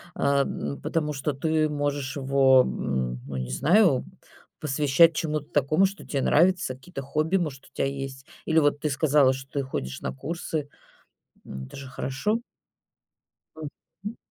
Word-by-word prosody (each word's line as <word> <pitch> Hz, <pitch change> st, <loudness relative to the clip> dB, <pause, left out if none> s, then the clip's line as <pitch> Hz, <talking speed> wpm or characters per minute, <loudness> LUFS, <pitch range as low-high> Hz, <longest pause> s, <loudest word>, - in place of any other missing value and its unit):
а, 140 Hz, 0 st, +2 dB
м, 70 Hz, -, -4 dB
потому 150 Hz, -, -1 dB
что 145 Hz, +1 st, -2 dB
ты 155 Hz, +2 st, +1 dB
можешь 145 Hz, -1 st, -2 dB
его, 135 Hz, -1 st, +5 dB
м, 65 Hz, -1 st, -2 dB
ну, 70 Hz, -, -6 dB
не 65 Hz, -1 st, -4 dB
знаю, 165 Hz, -, +4 dB, 0.5 s
посвящать 150 Hz, +3 st, +4 dB
чему-то 155 Hz, -2 st, -2 dB
такому, 155 Hz, +6 st, +3 dB
что 195 Hz, +1 st, -4 dB
те 140 Hz, -, -2 dB
нравится, 175 Hz, 0 st, +3 dB
какие-то 135 Hz, +3 st, -8 dB
хобби, 155 Hz, +7 st, 0 dB
может, 150 Hz, -7 st, -4 dB
у -, -, -18 dB
тя -, -, -1 dB
есть. 135 Hz, -1 st, -5 dB, 0.2 s
Или 160 Hz, 0 st, +4 dB
вот 145 Hz, -1 st, +2 dB
ты 150 Hz, -, -1 dB
сказала, 145 Hz, -2 st, +4 dB
что 135 Hz, 0 st, -9 dB
ты 140 Hz, -, -1 dB
ходишь 100 Hz, -, -5 dB
на -, -, -3 dB
курсы. 155 Hz, -, -4 dB, 0.8 s
М, 65 Hz, 0 st, -7 dB
это 65 Hz, -, -12 dB
же 135 Hz, -1 st, -8 dB
хорошо. 135 Hz, -, -1 dB, 1.2 s
Мгм. 165 Hz, +7 st, -9 dB
145 Hz, 155 wpm, -26 LUFS, 135-155 Hz, 1.2 s, его